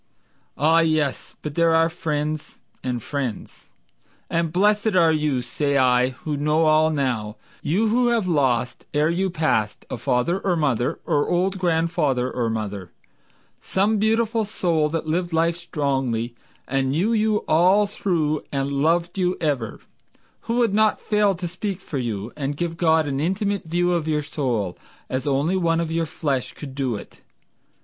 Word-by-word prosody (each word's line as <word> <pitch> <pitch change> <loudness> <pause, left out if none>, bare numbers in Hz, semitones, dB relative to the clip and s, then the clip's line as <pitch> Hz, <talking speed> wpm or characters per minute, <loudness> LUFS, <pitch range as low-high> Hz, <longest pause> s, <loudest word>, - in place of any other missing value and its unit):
Ah, 160 +3 +4
yes! 155 -4 0
but 150 - -4
there 165 +1 +3
are 165 0 +4
friends 155 -2 -3 0.3
and 125 -3 -2
friends. 130 -7 -5 0.6
And 165 -1 0
blessed 205 +3 +2
are 165 -3 +5
you, 150 -5 0
say 140 +2 0
I, 125 -1 +4
who 145 +4 -5
know 150 +3 +2
all 155 0 +4
now, 125 -8 -1 0.3
You 205 +9 +1
who 245 +2 +3
have 230 -5 +1
lost 130 -7 +1
ere 150 +2 +3
you 190 +3 0
pass, 110 - 0
A - - -2
father 125 - 0
or 190 -3 0
mother, 130 -7 0
or 145 0 +1
old 185 +2 +1
grandfather 160 -7 +1
or 120 -2 -1
mother 100 -4 -4 0.7
Some 205 +3 +1
beautiful 225 +1 +2
soul 170 -7 0
that 165 0 -2
lived 170 +2 -1
life 165 +1 +2
strongly 135 -8 -2 0.3
And 135 0 0
knew 180 +12 +1
you 215 -1 +1
all 185 +6 +4
through, 165 -7 -1
and 140 0 -1
loved 170 +6 +1
you 180 0 +1
ever, 140 -8 -2 0.6
Who 230 - -1
would 235 -4 +2
not 215 0 +3
fail 210 -2 +2
to 175 0 -4
speak 190 +2 -4
for 150 -7 -5
you, 110 -2 -3
And 145 -1 -3
give 170 0 -2
God 160 -2 +3
an 135 -1 -2
intimate 195 +5 -1
view 175 +2 +1
of 165 -2 -1
your 150 -1 0
soul 120 - -2 0.3
As 130 +3 -2
only 145 +6 +1
one 165 -2 +1
of 165 -1 -2
your 165 0 0
flesh 140 -3 -2
could 140 -3 -9
do 130 -4 -1
it. 100 - -10
160 Hz, 165 wpm, -23 LUFS, 135-180 Hz, 0.7 s, are